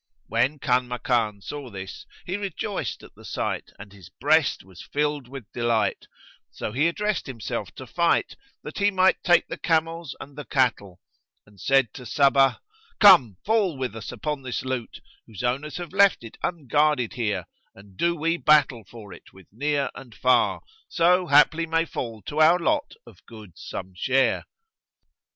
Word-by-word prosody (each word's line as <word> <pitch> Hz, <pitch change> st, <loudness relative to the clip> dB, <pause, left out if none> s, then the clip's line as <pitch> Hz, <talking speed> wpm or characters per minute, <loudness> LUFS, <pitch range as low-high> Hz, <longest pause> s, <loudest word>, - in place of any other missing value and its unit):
When 125 Hz, +7 st, 0 dB
Kanmakan 125 Hz, -5 st, 0 dB
saw 145 Hz, +2 st, -7 dB
this, 95 Hz, -2 st, -9 dB, 0.2 s
he 185 Hz, -, -3 dB
rejoiced 200 Hz, 0 st, -4 dB
at -, -, -14 dB
the -, -, -17 dB
sight -, -, -4 dB
and 105 Hz, -1 st, -12 dB
his 95 Hz, -4 st, -14 dB
breast -, -, +1 dB
was 95 Hz, -1 st, -14 dB
filled 145 Hz, -2 st, -2 dB
with 130 Hz, -4 st, -10 dB
delight; 120 Hz, -2 st, 0 dB, 0.4 s
so -, -, -6 dB
he 140 Hz, +8 st, +2 dB
addressed 205 Hz, +1 st, -2 dB
himself 120 Hz, -5 st, -5 dB
to -, -, -9 dB
fight, -, -, +1 dB, 0.3 s
that 150 Hz, -, -7 dB
he 200 Hz, 0 st, +4 dB
might 190 Hz, -1 st, +3 dB
take 175 Hz, -1 st, +4 dB
the -, -, -7 dB
camels 165 Hz, -2 st, -1 dB
and 140 Hz, -, -11 dB
the 150 Hz, -, -7 dB
cattle, 115 Hz, -, 0 dB, 0.4 s
and 100 Hz, -2 st, -19 dB
said 135 Hz, -5 st, +2 dB
to 125 Hz, -3 st, -9 dB
Sabbah, 135 Hz, 0 st, +4 dB, 0.4 s
"Come, 165 Hz, -, +7 dB
fall 205 Hz, -8 st, +1 dB
with 130 Hz, -4 st, -4 dB
us 115 Hz, -, -7 dB
upon 150 Hz, -2 st, -4 dB
this 130 Hz, -1 st, -4 dB
loot, 130 Hz, -3 st, -4 dB, 0.3 s
whose 110 Hz, +1 st, -8 dB
owners 140 Hz, +6 st, -2 dB
have 175 Hz, 0 st, -7 dB
left 200 Hz, -8 st, +4 dB
it 115 Hz, -, -10 dB
unguarded 150 Hz, -5 st, +1 dB
here, 105 Hz, -7 st, -2 dB, 0.3 s
and 100 Hz, -1 st, -17 dB
do 170 Hz, -, +1 dB
we 165 Hz, +1 st, 0 dB
battle 145 Hz, -8 st, +3 dB
for 110 Hz, -4 st, -11 dB
it -, -, -15 dB
with 95 Hz, -2 st, -16 dB
near 140 Hz, +5 st, -1 dB
and 120 Hz, -4 st, -12 dB
far, 130 Hz, 0 st, +2 dB, 0.3 s
so 180 Hz, +1 st, +3 dB
haply 155 Hz, +3 st, +4 dB
may 165 Hz, +1 st, +1 dB
fall 115 Hz, -, -6 dB
to 150 Hz, -, -4 dB
our 165 Hz, +3 st, +6 dB
lot 290 Hz, -, -1 dB
of -, -, -17 dB
goods 110 Hz, -6 st, -13 dB
some 95 Hz, 0 st, -7 dB
share." 130 Hz, +8 st, +1 dB
135 Hz, 165 wpm, -25 LUFS, 115-165 Hz, 0.4 s, Come